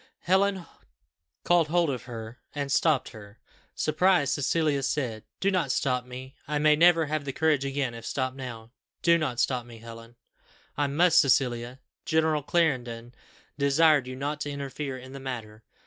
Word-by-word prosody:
Helen 190 0 +1 0.8
caught 175 -2 +3
hold 170 -1 +2
of 125 -3 -5
her, 115 -1 -8 0.2
and 140 -1 -3
stopped 145 -3 +2
her. 105 -2 -13 0.4
Surprised, 155 -2 +2
Cecilia 145 0 +1
said, 125 -5 -2 0.2
"Do 195 - +1
not 175 -8 0
stop 125 -2 0
me. 130 +1 -9
I 150 +1 -1
may 150 0 +4
never 165 0 +5
have 155 0 -2
the 140 - -4
courage 150 -1 +1
again 135 -2 -2
if 115 -1 -9
stopped 130 +1 -2
now. 120 -4 -8 0.3
Do 170 0 +5
not 130 -6 -2
stop 125 -2 +1
me, 115 -1 -13
Helen." 115 +1 -12 0.6
"I 145 0 0
must, 165 +5 +4
Cecilia. 125 -1 +1 0.2
General 160 -1 +1
Clarendon 125 -7 -1 0.5
desired 140 -1 +4
you 130 - -6
not 145 +3 -4
to 145 - -3
interfere 140 -1 -5
in 130 +1 -11
the 135 - -7
matter." 115 -5 -7
140 Hz, 165 wpm, -27 LUFS, 125-155 Hz, 0.8 s, never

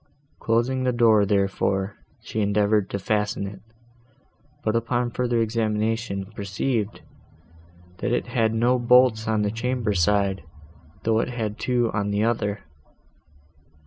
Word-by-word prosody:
Closing 120 +3 +1
the 130 - +2
door, 110 -4 +4
therefore, 100 0 0 0.3
she 110 - -3
endeavoured 105 0 +2
to - - -2
fasten 105 0 -1
it, 100 -1 -8 1.0
but, 110 - 0
upon 120 +1 0
further 120 -1 0
examination, 110 -2 -1
perceived, 105 +2 -2 1.0
that 125 - -1
it 120 - 0
had 115 -3 +1
no 120 +3 +2
bolts 120 -2 +4
on 110 -1 +1
the 105 - 0
chamber 115 -1 -1
side, 95 +1 +1 0.6
though 110 0 +2
it 115 - -1
had 110 -3 -4
two 120 -1 +1
on 100 -1 -1
the 100 +1 0
other. 105 -3 -1
110 Hz, 130 wpm, -24 LUFS, 100-120 Hz, 1.0 s, door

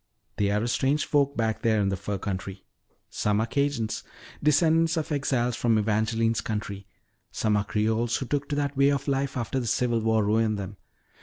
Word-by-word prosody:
They 100 -1 +1
are 105 +2 +1
a - - -1
strange 135 +5 +1
folk 140 -1 +1
back 110 -1 0
there 110 -2 +2
in 100 -1 +1
the 95 - 0
fur 100 +2 -4
country. 95 0 -5 0.5
"Some 105 0 0
are 110 - +1
Cajuns, 120 -4 -1 0.4
descendants 160 +2 +3
of 155 0 -2
exiles 130 -4 0
from 115 -2 +2
Evangeline's 110 +2 +1
country; 100 -2 -5 0.4
some 110 -1 0
are 105 0 +1
Creoles 110 +2 0
who 135 - -4
took 145 +2 -2
to 145 - -1
that 145 -1 -1
way 140 +1 +4
of 140 -1 -1
life 140 -1 -1
after 120 +2 -2
the 120 - -3
Civil 120 0 +1
War 110 -1 +2
ruined 110 0 +2
them. 100 0 -6
115 Hz, 190 wpm, -26 LUFS, 105-140 Hz, 0.5 s, way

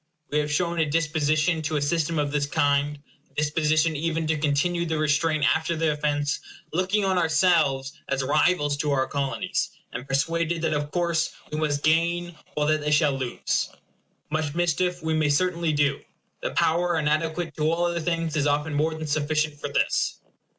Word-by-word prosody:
We 150 - +2
have 150 0 -1
shown 170 +2 0
a 155 -2 +2
disposition 155 +1 +1
to 155 0 -2
a - - -1
system 165 +2 0
of 145 -1 0
this 145 -1 0
kind, 145 +1 +1 0.3
a - - -33
disposition 155 +1 +1
even 160 +1 -1
to 155 0 0
continue 155 +4 +1
the 160 -2 -1
restraint 155 0 +1
after 160 +1 -1
the 160 -1 +1
offence, 145 -1 -1 0.3
looking 190 +4 +1
on 190 -1 +2
ourselves 160 -5 +2 0.2
as 135 0 0
rivals 145 +1 +2
to 150 0 -1
our 130 -1 +2
Colonies, 175 +7 -2 0.2
and 125 +3 -6
persuaded 165 +4 0
that 160 - +1
of 145 -1 -2
course 170 -1 0 0.2
we 150 - -2
must 145 -2 -1
gain 170 +2 +1 0.2
all 150 - +1
that 155 0 +2
they 150 - -1
shall 150 -1 +3
lose. 130 -2 -1 0.6
Much 155 -1 -1
mischief 175 +1 0
we 160 0 0
may 155 -1 +2
certainly 170 +2 +1
do. 145 -2 +1 0.4
The - - -1
power 175 +1 +1
inadequate 160 +1 -1
to 155 0 +1
all 170 +1 +1
other 170 0 -1
things 165 -1 -1
is 150 -1 +1
often 145 +1 0
more 155 +2 +1
than 155 0 -5
sufficient 155 0 0
for 145 - -4
this. 140 - 0
155 Hz, 180 wpm, -25 LUFS, 145-165 Hz, 0.6 s, shall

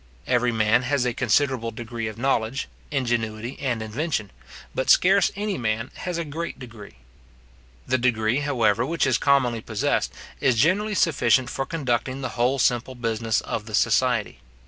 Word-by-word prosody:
Every 125 -1 +2
man 110 0 +3
has 130 0 0
a 125 - 0
considerable 130 0 +1
degree 115 0 -5
of 110 0 -7
knowledge, 120 0 0 0.2
ingenuity, 120 -3 -2
and 125 -5 -2
invention 110 - -3 0.4
but 130 - -2
scarce 195 +1 +5
any 205 -1 -2
man 115 +1 -2
has 180 -2 -4
a 170 - -2
great 165 +3 -5
degree. 115 - -11 0.9
The 130 0 +1
degree, 120 0 +1
however, 120 -6 +1
which 165 +6 0
is - - +2
commonly 130 -5 +2
possessed, 110 -1 -1 0.3
is 130 -3 +3
generally 190 - +2
sufficient 130 - +2
for 135 - -3
conducting 130 -4 -2
the 130 - -3
whole 125 +3 +1
simple 125 0 +1
business 115 -2 -1
of 110 -1 -4
the 110 - -2
society. 120 0 +1
125 Hz, 155 wpm, -24 LUFS, 115-140 Hz, 0.9 s, scarce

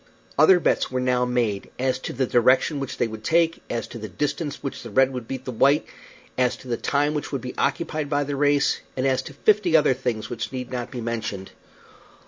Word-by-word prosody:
Other 165 +5 +6
bets - - +1
were 130 - -2
now 125 -1 +2
made 120 -5 -1
as 130 0 0
to - - -5
the 130 +1 0
direction 130 +5 +3
which 135 -2 -5
they - - +1
would 110 -1 -8
take, 165 +4 +2
as 115 - -3
to 120 - -8
the 110 -1 -6
distance 145 - -2
by - - -25
which 135 - -4
the 120 - -8
red 130 +4 +3
would 125 -3 -5
beat 130 -1 -5
the 130 - -3
white, 140 +6 +3 0.5
as 125 -1 +2
to 130 - -14
the 120 - 0
time 145 +4 0
which 150 - -3
would 135 - -2
be 125 - -6
occupied 155 -3 -1
by 145 0 +1
the 145 0 -3
race, 145 0 +2 0.2
and 130 - 0
as 130 -1 +2
to 140 - -10
fifty 195 -1 +4
other 150 -3 +4
things 120 -4 -3
which 120 0 -5
need 125 -2 -5
not 125 -1 -3
be 125 -2 -6
mentioned. 110 -4 -4
130 Hz, 230 wpm, -24 LUFS, 120-145 Hz, 0.5 s, Other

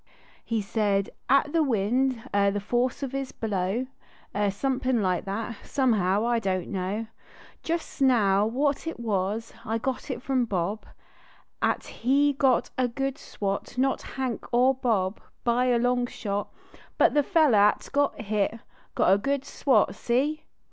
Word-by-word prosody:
He 225 -3 -1
said 200 -1 0 0.2
at 280 +2 +3
the 330 - +3
wind, 250 0 +1
er 200 0 +4
the 205 +1 -1
force 245 +6 -1
of 270 - -3
his 275 -1 -3
blow, 205 +2 -2 0.5
Ivr 205 -1 +1
somepin 255 +3 0
like 180 -2 0
that; 215 +3 -4
somehow 215 -6 +1
I 240 -1 +2
don 190 -4 0
t - - -10
know 195 +3 -2 0.6
Just 330 -3 -4
now 210 -6 +4
what 280 +6 0
it 325 - -4
was 215 0 -2
I 225 -1 -1
got 260 +4 -3
it 250 -2 -4
from 260 -3 +1
Bob 200 +1 -2 0.7
At - - 0
he 280 +4 +2
got 265 -2 +2
a 255 - +3
good 270 +3 -3
swat; 200 +4 -4
not 265 +1 +1 0.2
Hunk 255 -4 -3
er 250 +2 +4
Bob, 220 -7 0 0.2
By 245 +1 +2
a 245 -1 +3
long 245 +1 +1
shot. 205 -3 -4 0.5
But - - +4
the 295 - +4
feller 300 - +4
at 205 +1 +3
got 285 0 +1
hit 215 +1 -1 0.4
(iot 185 - +5
a 195 - +3
good 275 +5 -1
swat. 250 -7 +2
See 285 +6 -1
235 Hz, 160 wpm, -26 LUFS, 205-265 Hz, 0.7 s, iot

